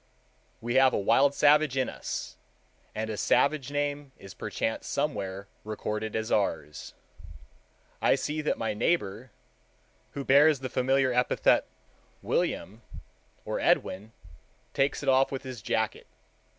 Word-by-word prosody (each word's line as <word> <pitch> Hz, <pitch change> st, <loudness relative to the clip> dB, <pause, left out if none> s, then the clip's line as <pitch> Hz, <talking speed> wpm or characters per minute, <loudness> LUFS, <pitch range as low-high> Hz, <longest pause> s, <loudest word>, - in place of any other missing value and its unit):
We 120 Hz, +1 st, -3 dB
have 130 Hz, -1 st, +5 dB
a -, -, +1 dB
wild 135 Hz, +8 st, +3 dB
savage 150 Hz, -2 st, +4 dB
in 130 Hz, -, +1 dB
us, -, -, -6 dB, 0.6 s
and 110 Hz, +1 st, -2 dB
a 105 Hz, -, -5 dB
savage 140 Hz, +3 st, +2 dB
name 145 Hz, -1 st, -3 dB
is 95 Hz, -, -12 dB
perchance 110 Hz, -, -3 dB
somewhere 100 Hz, -10 st, -3 dB, 0.2 s
recorded 105 Hz, 0 st, -4 dB
as 110 Hz, 0 st, -2 dB
ours. 80 Hz, -7 st, -2 dB, 1.1 s
I -, -, +4 dB
see 155 Hz, +1 st, -3 dB
that 150 Hz, -, -1 dB
my 110 Hz, -1 st, -2 dB
neighbor, 110 Hz, -, -1 dB, 0.8 s
who 140 Hz, -1 st, -5 dB
bears 140 Hz, +1 st, +5 dB
the 130 Hz, -, -4 dB
familiar 130 Hz, 0 st, +1 dB
epithet 125 Hz, 0 st, +2 dB, 0.6 s
William 110 Hz, +5 st, -2 dB, 0.6 s
or -, -, -3 dB
Edwin, 105 Hz, +4 st, 0 dB, 0.6 s
takes 135 Hz, +1 st, 0 dB
it -, -, -6 dB
off 135 Hz, 0 st, +4 dB
with 135 Hz, -, -4 dB
his 130 Hz, -4 st, -8 dB
jacket. -, -, -2 dB
130 Hz, 130 wpm, -28 LUFS, 110-140 Hz, 1.1 s, have